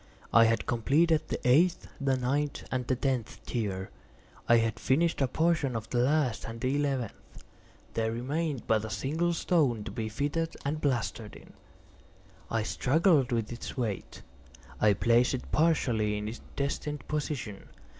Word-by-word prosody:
I 115 0 +8
had 115 0 +1
completed 150 +7 +2
the - - -3
eighth, 165 +8 +4
the 135 -1 +2
ninth, 140 +3 -1
and 125 -2 -2
the 130 - +2
tenth 125 -3 -2
tier. 100 -5 -3 0.6
I 120 - +7
had 115 -2 0
finished 160 +4 +1
a 135 - +3
portion 160 -2 +1
of 110 -1 -5
the 120 - +1
last 130 -2 +1
and 115 0 -7
the 130 +3 0
eleventh; 135 -6 -3 0.5
there 110 0 0
remained 140 +4 -2
but 110 -1 +2
a 110 - -5
single 145 - 0
stone 150 -10 +1
to - - -6
be 110 -3 -3
fitted 145 +8 -2
and 155 +2 -1
plastered 120 -5 -1
in. - - -14 1.0
I 115 -1 0
struggled 145 - +2
with 115 -2 -1
its 120 +3 -7
weight; 110 -6 -4 0.6
I 105 -1 +5
placed 120 +5 +3
it 125 - -8
partially 120 -10 +2
in 105 0 -4
its 115 +2 -6
destined 140 0 -3
position. 145 -9 -4
125 Hz, 155 wpm, -29 LUFS, 115-150 Hz, 1.0 s, I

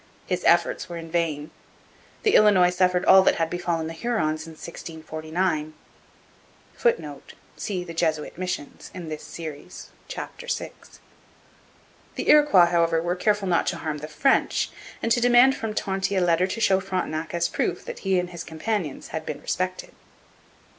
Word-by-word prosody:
His - - -2
efforts 185 - +3
were 170 - -5
in 165 -1 -8
vain. 155 -3 -1 0.7
The 425 - +3
Illinois 190 -4 +6
suffered 180 0 +2
all 190 - +8
that - - +3
had 165 -1 -1
befallen 175 -2 -1
the 165 - -5
Hurons 160 -6 -1
in 165 - -9
1649. 160 0 -4 1.0
[Footnote: 480 0 -1 0.2
See 185 -4 -3
The 170 -1 -8
Jesuit 160 -2 -1
Missions 180 -5 -5
in 175 -3 -7
this 155 -1 -5
Series, 155 -4 -9 0.2
chap. - - -7
vi.] 485 -1 -3 1.4
The - - -3
Iroquois, 290 -13 +7
however, 165 -1 +3
were 175 +2 -1
careful 205 +1 +1
not 175 -2 +2
to - - -1
harm 155 -2 -4
the 150 - -7
French, 255 - +1 0.3
and 230 - 0
to 240 - +3
demand 245 +2 +6
from 220 -1 -4
Tonty 195 0 -1
a 190 - +2
letter 175 +1 +3
to 195 - -4
show 195 -4 +3
Frontenac 175 -4 -3
as 170 0 +1
proof - - -2
that 485 -1 -7
he 190 -1 +1
and 180 0 -2
his 170 -1 -6
companions 160 -1 -3
had 160 - -4
been - - -5
respected. 185 0 -3
175 Hz, 160 wpm, -25 LUFS, 160-195 Hz, 1.4 s, all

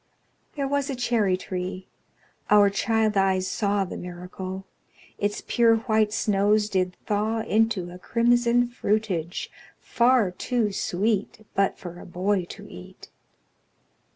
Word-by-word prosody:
There 280 -2 -1
was 285 0 0
a 275 - -2
cherry 230 -6 +1
tree 185 0 -5 0.6
our 205 -1 +6
child 220 +1 +1
eyes 190 -1 +2
saw 200 -2 0
The 180 - -7
miracle: 185 +2 -7 0.5
Its 205 0 -1
pure 230 -2 +4
white 220 -2 +1
snows 210 0 +2
did 185 -2 -1
thaw 215 +2 0
Into 215 -5 +1
a 180 - -10
crimson 240 +3 +2
fruitage, 205 -7 -2 0.3
far 235 -5 +3
too 225 +3 -1
sweet 205 +3 -1
But 195 0 +1
for 175 -1 -9
a - - -11
boy 185 +1 0
to - - -11
eat. 90 - -12
205 Hz, 125 wpm, -25 LUFS, 185-225 Hz, 0.6 s, our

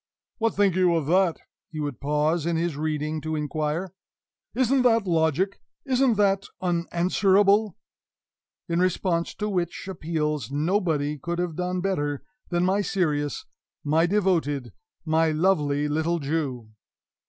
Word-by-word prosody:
"What 225 0 +1
think 200 -3 +3
you 180 -2 +3
of 160 -3 0
that?" 180 +1 +2 0.3
he 155 - -7
would 145 -4 -4
pause 150 +3 0
in 170 - +1
his 165 -1 -1
reading 155 0 -2
to 155 +1 -3
inquire. 155 +4 -2 0.6
"Isn't 260 +1 +3
that 230 -4 +3
logic? 165 +2 +1 0.2
Isn't 260 -3 +2
that 195 -1 +2
unanswerable?" 190 +4 +2 0.9
In 170 -1 0
responding 180 -2 0
to 210 - -2
which 180 -3 -2
appeals 150 - -2
nobody 150 -1 0
could 170 +4 -3
have 175 -2 -2
done 180 +1 -2
better 145 -7 -1 0.3
than 175 0 +1
my 195 +2 +2
serious, 150 -7 -1 0.4
my 160 +3 +2
devoted, 170 -9 0 0.3
my 160 0 +2
lovely 150 -3 +1
little 160 +3 0
Jew. 140 -7 -3
170 Hz, 130 wpm, -25 LUFS, 150-190 Hz, 0.9 s, think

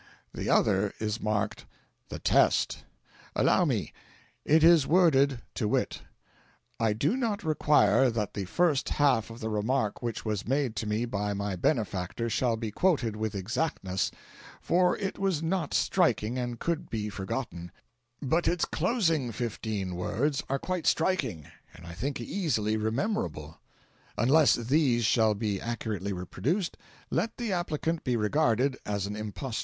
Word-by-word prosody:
The - - -4
other 100 0 +2
is 110 0 -3
marked 105 0 -2 0.4
'THE - - -5
TEST.' - - +2 0.5
Allow - - +3
me. - - -1 0.5
It 155 +1 +4
is 165 -4 +6
worded 140 -7 +3
to 110 - -1
wit: - - -1 0.8
"'I 110 -2 +2
do 145 - +1
not 230 -6 -1
require 135 - +4
that 110 -3 -2
the 100 - -3
first 155 - +1
half 130 -7 +3
of 115 +1 -10
the 110 - -2
remark 110 +1 -1
which 120 -2 -4
was 105 -2 -2
made 135 -3 0
to 110 - -2
me 105 +3 0
by 105 -3 -2
my 100 -1 -2
benefactor 105 - -1
shall 120 0 +1
be 110 -2 -4
quoted 130 - +1
with 110 -1 -3
exactness, 95 - -1 0.5
for 180 +1 +2
it 195 -2 -4
was 190 -5 0
not 165 -2 -1
striking, 120 - +1
and 120 -1 -3
could 170 -2 -2
be 105 -2 -3
forgotten; 95 -3 -5 0.5
but 160 +6 +1
its 175 -1 +2
closing 165 - 0
fifteen 110 -5 -3
words 135 +10 -1
are 135 - +1
quite 180 +3 -3
striking, 135 - +1 0.3
and 85 - -13
I 85 - -8
think 130 +11 -3
easily 120 - -1
rememberable; 110 - -2 0.6
unless 140 +6 +5
THESE 120 -1 +2
shall 110 -2 +3
be 100 -2 -2
accurately 110 -4 -3
reproduced, 125 - -2 0.4
let 225 - -1
the 235 -5 -2
applicant 165 -2 -2
be 125 -2 0
regarded 125 +3 +2
as 100 -2 -2
an 100 +1 -4
impostor. 110 +3 -4
120 Hz, 150 wpm, -28 LUFS, 105-155 Hz, 0.8 s, is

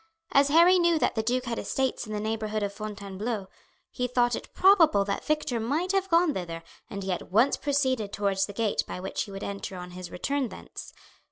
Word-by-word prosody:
As 275 0 +5
Harry 340 +5 +6
knew 340 -1 +3
that - - +1
the 220 - 0
duke 250 +3 -1
had 235 -1 -3
estates 265 -3 -1
in - - -7
the 210 - -2
neighbourhood 215 0 -2
of 200 0 -2
Fontainebleau 205 0 -5 0.4
he 250 -1 -2
thought 245 -1 +2
it - - -8
probable 330 - +5
that 200 0 -2
Victor 300 -6 0
might 300 +11 0
have 385 -1 0
gone 335 -2 +4
thither, 165 -2 -5 0.3
and 200 0 -5
he 190 - -2
at 180 - -4
once 230 +8 +4
proceeded 260 -7 0
towards 200 -2 0
the 205 - -8
gate 220 0 0
by - - -5
which 190 +1 -3
he 200 - -11
would 195 0 -7
enter 195 -1 -5
on 180 0 -8
his 180 0 -8
return 275 +7 -2
thence. - - -10
225 Hz, 210 wpm, -27 LUFS, 200-280 Hz, 0.4 s, Harry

